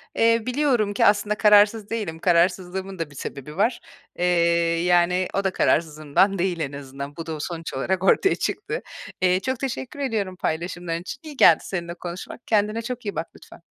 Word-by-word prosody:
Eee, 230 Hz, 0 st, +3 dB
biliyorum 250 Hz, -6 st, +1 dB
ki -, -, +2 dB
aslında 205 Hz, +1 st, +3 dB
kararsız 210 Hz, 0 st, +5 dB
değilim, 205 Hz, -8 st, -4 dB
kararsızlığımın 180 Hz, +2 st, +1 dB
da 160 Hz, -3 st, -3 dB
bir -, -, -15 dB
sebebi 140 Hz, +4 st, -7 dB
var. 230 Hz, +4 st, +1 dB, 0.4 s
Eee, 180 Hz, -, +1 dB, 0.6 s
yani, 180 Hz, +1 st, +3 dB
o 195 Hz, -, 0 dB
da 190 Hz, -, +1 dB
kararsızlığımdan 155 Hz, +4 st, +1 dB
değil 175 Hz, -1 st, 0 dB
en 145 Hz, -3 st, -2 dB
azından. 140 Hz, +1 st, -8 dB
Bu 165 Hz, -, -6 dB
da 160 Hz, -, -4 dB
o -, -, -8 dB
sonuç 165 Hz, +1 st, -5 dB
olarak 185 Hz, +7 st, -1 dB
ortaya 385 Hz, -, +4 dB
çıktı. -, -, -3 dB, 0.4 s
Eee, 185 Hz, 0 st, +3 dB
çok 260 Hz, +4 st, -3 dB
teşekkür 270 Hz, +1 st, -5 dB
ediyorum 215 Hz, -9 st, -2 dB
paylaşımların 170 Hz, 0 st, -3 dB
için. 195 Hz, +9 st, -7 dB
İyi 300 Hz, -3 st, -10 dB
geldi 165 Hz, -, +7 dB
seninle 170 Hz, -2 st, -4 dB
konuşmak. 175 Hz, +6 st, -8 dB
Kendine 215 Hz, +1 st, +1 dB
çok 245 Hz, 0 st, -6 dB
iyi 205 Hz, -, -3 dB
bak 165 Hz, -, -3 dB
lütfen. -, -, -15 dB
185 Hz, 180 wpm, -23 LUFS, 170-215 Hz, 0.6 s, geldi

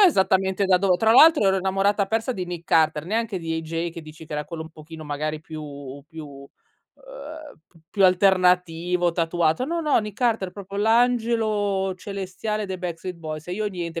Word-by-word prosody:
esattamente 190 Hz, -, +3 dB
da 185 Hz, -1 st, +4 dB
dove 185 Hz, -2 st, +2 dB
tra 220 Hz, +3 st, +3 dB
l'altro 305 Hz, -5 st, +7 dB
ero 190 Hz, 0 st, +3 dB
innamorata 195 Hz, +2 st, +1 dB
persa 225 Hz, +4 st, -1 dB
di 185 Hz, -5 st, -4 dB
Nick 175 Hz, -1 st, -7 dB
Carter, 155 Hz, -1 st, +2 dB
neanche 220 Hz, -1 st, -1 dB
di 165 Hz, -1 st, -3 dB
AJ 165 Hz, +1 st, -3 dB
che 165 Hz, 0 st, -9 dB
dici 155 Hz, +1 st, -12 dB
che -, -, -10 dB
era 150 Hz, 0 st, -2 dB
quello 160 Hz, +1 st, -6 dB
un 160 Hz, -, -11 dB
pochino 160 Hz, 0 st, -11 dB
magari 150 Hz, +1 st, -3 dB
più 145 Hz, -3 st, -9 dB
più, 160 Hz, -2 st, -9 dB
uhm, 140 Hz, -1 st, -13 dB, 1.2 s
p -, -, -37 dB
più 195 Hz, -2 st, +2 dB
alternativo, 180 Hz, -2 st, +3 dB
tatuato. 165 Hz, +3 st, +1 dB
No, 335 Hz, +4 st, -2 dB
no, 300 Hz, -2 st, +2 dB
Nick 210 Hz, -2 st, -7 dB
Carter, 225 Hz, -7 st, +1 dB
proprio 200 Hz, +1 st, -9 dB
l'angelo 220 Hz, -4 st, +1 dB
celestiale 200 Hz, +2 st, -4 dB
dei 190 Hz, -1 st, -5 dB
Backstreet 180 Hz, 0 st, -5 dB
Boys. 155 Hz, -1 st, -7 dB
E 180 Hz, -, -5 dB
io 210 Hz, +2 st, -2 dB
niente 170 Hz, -3 st, -5 dB
185 Hz, 180 wpm, -24 LUFS, 160-205 Hz, 1.2 s, l'altro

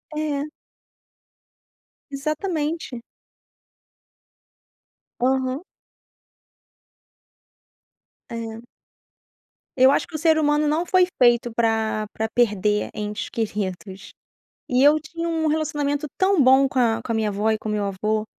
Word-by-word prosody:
É. 300 Hz, -1 st, -2 dB, 1.6 s
Exatamente. 305 Hz, -2 st, -3 dB, 2.2 s
Aham. 260 Hz, +3 st, 0 dB, 2.7 s
É. 230 Hz, 0 st, -7 dB, 1.1 s
Eu 260 Hz, +1 st, +7 dB
acho 285 Hz, -, 0 dB
que 320 Hz, -, -11 dB
o -, -, 0 dB
ser 320 Hz, 0 st, +3 dB
humano 295 Hz, 0 st, +2 dB
não 325 Hz, +4 st, 0 dB
foi 370 Hz, -1 st, +4 dB, 0.2 s
feito 240 Hz, -1 st, +4 dB
pra 220 Hz, -2 st, 0 dB
pra 220 Hz, -, -2 dB
perder 210 Hz, -3 st, +1 dB
entes 210 Hz, 0 st, -4 dB
queridos 195 Hz, -3 st, -4 dB, 0.6 s
e 250 Hz, +1 st, +2 dB
eu 295 Hz, +2 st, +6 dB
tinha 335 Hz, +2 st, -5 dB
um 320 Hz, -1 st, 0 dB
relacionamento 300 Hz, -1 st, -1 dB
tão 380 Hz, -4 st, +3 dB
bom 265 Hz, +1 st, +6 dB
com 265 Hz, 0 st, -3 dB
a 230 Hz, -3 st, +2 dB
com 230 Hz, -, -2 dB
a -, -, -1 dB
minha 220 Hz, -1 st, 0 dB
avó 210 Hz, +2 st, 0 dB
e 220 Hz, -, 0 dB
com 215 Hz, -, -7 dB
o -, -, -1 dB
meu 210 Hz, -1 st, -1 dB
avô 215 Hz, +2 st, -1 dB
255 Hz, 115 wpm, -23 LUFS, 220-305 Hz, 2.7 s, Eu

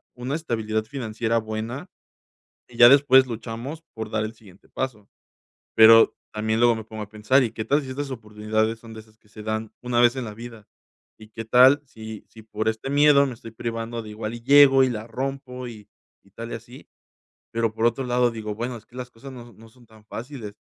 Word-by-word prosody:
una 125 Hz, +4 st, -4 dB
estabilidad 110 Hz, -8 st, -2 dB
financiera 115 Hz, -2 st, -2 dB
buena, 110 Hz, -, -5 dB, 0.8 s
y 120 Hz, -, -16 dB
ya 120 Hz, 0 st, +9 dB
después 130 Hz, -1 st, +6 dB
luchamos 120 Hz, +6 st, -6 dB
por 110 Hz, -1 st, -5 dB
dar 110 Hz, 0 st, 0 dB
el 110 Hz, -, -6 dB
siguiente 100 Hz, -4 st, -19 dB
paso, 110 Hz, -6 st, -5 dB, 0.7 s
pero 115 Hz, 0 st, +7 dB, 0.2 s
también 110 Hz, +1 st, -1 dB
luego 120 Hz, -1 st, +4 dB
me 110 Hz, -, -6 dB
pongo 110 Hz, -1 st, -8 dB
a 105 Hz, -, -12 dB
pensar: 110 Hz, +6 st, +2 dB
"¿Y 115 Hz, -, -2 dB
qué 110 Hz, -, -5 dB
tal 145 Hz, +2 st, +2 dB
si 135 Hz, -, -9 dB
estas 135 Hz, +1 st, -5 dB
oportunidades 110 Hz, -1 st, -2 dB
son 115 Hz, -1 st, -12 dB
de 110 Hz, -, -9 dB
esas 110 Hz, 0 st, -24 dB
que 105 Hz, -, -29 dB
se 110 Hz, -, -11 dB
dan 110 Hz, 0 st, -4 dB
una 120 Hz, -1 st, 0 dB
vez 120 Hz, +1 st, +4 dB
en 130 Hz, -2 st, -4 dB
la 105 Hz, -1 st, -8 dB
vida? 115 Hz, -2 st, -11 dB, 0.5 s
¿Y 110 Hz, 0 st, -14 dB
qué 115 Hz, +1 st, -7 dB
tal 130 Hz, +5 st, +6 dB
si 110 Hz, -4 st, -10 dB
si 110 Hz, -, -15 dB
por 110 Hz, 0 st, -2 dB
este 110 Hz, +4 st, -4 dB
miedo 145 Hz, 0 st, +5 dB
me 130 Hz, -, -5 dB
estoy 115 Hz, -, -11 dB
privando 115 Hz, +1 st, -5 dB
de 110 Hz, -, -10 dB
igual 110 Hz, +1 st, -5 dB
y 120 Hz, -, -10 dB
llego 135 Hz, 0 st, +7 dB
y 130 Hz, -, +2 dB
la 110 Hz, -1 st, -6 dB
rompo 130 Hz, +1 st, -5 dB
y, 105 Hz, -3 st, -11 dB, 0.3 s
y -, -, -24 dB
tal -, -, -8 dB
y -, -, -3 dB
así?". -, -, -12 dB, 0.7 s
Pero, 115 Hz, -1 st, 0 dB
por 115 Hz, +1 st, +1 dB
otro 120 Hz, +3 st, 0 dB
lado, 125 Hz, 0 st, +2 dB
digo: 110 Hz, -2 st, -5 dB
"Bueno, 120 Hz, +3 st, -4 dB
es 110 Hz, -1 st, -14 dB
que -, -, -26 dB
las 125 Hz, -1 st, -7 dB
cosas 135 Hz, +4 st, -12 dB
no 120 Hz, -2 st, -11 dB
no 115 Hz, +2 st, -17 dB
son 120 Hz, +1 st, -22 dB
tan 110 Hz, -1 st, -20 dB
fáciles". 115 Hz, -3 st, -8 dB
115 Hz, 220 wpm, -24 LUFS, 110-125 Hz, 0.8 s, ya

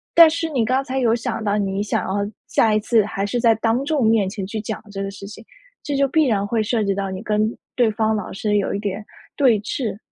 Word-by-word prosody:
但 335 Hz, -1 st, +9 dB
是 325 Hz, 0 st, -2 dB
你 255 Hz, -7 st, 0 dB
刚 260 Hz, +3 st, +1 dB
才 265 Hz, 0 st, -3 dB
有 230 Hz, -2 st, +3 dB
想 230 Hz, -1 st, -3 dB
到 205 Hz, -1 st, 0 dB
你 195 Hz, -1 st, -1 dB
想 210 Hz, -, -1 dB
要 200 Hz, +2 st, -2 dB, 0.2 s
下 220 Hz, -2 st, +3 dB
一 215 Hz, -, +3 dB
次 220 Hz, -1 st, +3 dB
还 200 Hz, -2 st, -3 dB
是 225 Hz, +4 st, -1 dB
在 230 Hz, -1 st, +4 dB
当 230 Hz, +5 st, 0 dB
众 290 Hz, -6 st, +1 dB
面 220 Hz, -4 st, +3 dB
前 195 Hz, -1 st, -5 dB
去 215 Hz, +3 st, -5 dB
讲 215 Hz, +1 st, -5 dB
这 195 Hz, -1 st, -5 dB
个 195 Hz, -, -3 dB
事 195 Hz, 0 st, -10 dB
情， 205 Hz, +2 st, -10 dB, 0.4 s
这 290 Hz, -, -3 dB
就 275 Hz, 0 st, +3 dB
必 315 Hz, +2 st, +3 dB
然 205 Hz, -6 st, +1 dB
会 220 Hz, +2 st, 0 dB
涉 220 Hz, +1 st, 0 dB
及 200 Hz, -1 st, +1 dB
到 195 Hz, 0 st, -3 dB
你 190 Hz, 0 st, -5 dB
跟 215 Hz, 0 st, 0 dB, 0.2 s
对 240 Hz, -3 st, +4 dB
方 220 Hz, 0 st, 0 dB
老 210 Hz, -3 st, -3 dB
师 210 Hz, +1 st, 0 dB
有 200 Hz, -, -1 dB
一 200 Hz, -, -2 dB
点 205 Hz, 0 st, -4 dB, 0.3 s
对 255 Hz, -6 st, +4 dB
峙。 220 Hz, -1 st, -3 dB
220 Hz, 275 characters per minute, -21 LUFS, 200-240 Hz, 0.4 s, 但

